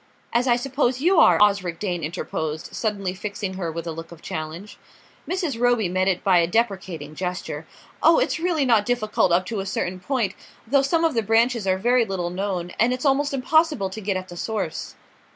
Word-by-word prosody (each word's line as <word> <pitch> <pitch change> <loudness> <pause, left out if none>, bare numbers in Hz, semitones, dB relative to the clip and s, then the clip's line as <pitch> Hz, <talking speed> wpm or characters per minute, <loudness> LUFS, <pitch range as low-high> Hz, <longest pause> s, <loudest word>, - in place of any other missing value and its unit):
"As 240 +2 +2
I 240 - +5
suppose 255 0 0
you 350 +4 +4
are?" - - +6
Osric 200 -5 +3
Dane 175 -3 -3
interposed, 155 -1 -4
suddenly 200 -4 -2
fixing 200 0 -5
her 180 -3 -3
with 165 +1 -5
a 165 - -3
look 165 +1 -8
of 170 - -11
challenge. 160 +6 -6 0.5
Mrs. 345 -10 -2
Roby 245 -5 +3
met 185 +1 +1
it 185 -2 0
by 185 -3 +5
a 170 - +2
deprecating 185 -7 -1
gesture. 180 +3 -4 0.3
"Oh, - - +6
it's - - +1
really 330 -4 +1
not 225 -5 +4
difficult 215 -6 +1
up 180 +2 +3
to 220 +1 -3
a 195 - -3
certain 185 -1 -2
point; 220 -1 -1 0.3
though 275 +4 +3
some 325 +4 +1
of 325 - +2
the 230 - +1
branches 225 0 +2
are 185 0 +2
very 240 +4 +3
little 185 -5 -3
known, 180 -2 -3
and 235 +2 +4
it's 255 +3 -4
almost 280 +1 +2
impossible 280 - +2
to 220 - -7
get 195 -1 -1
at 185 0 -6
the 175 - -9
source." 220 +4 -4
205 Hz, 205 wpm, -23 LUFS, 180-245 Hz, 0.5 s, are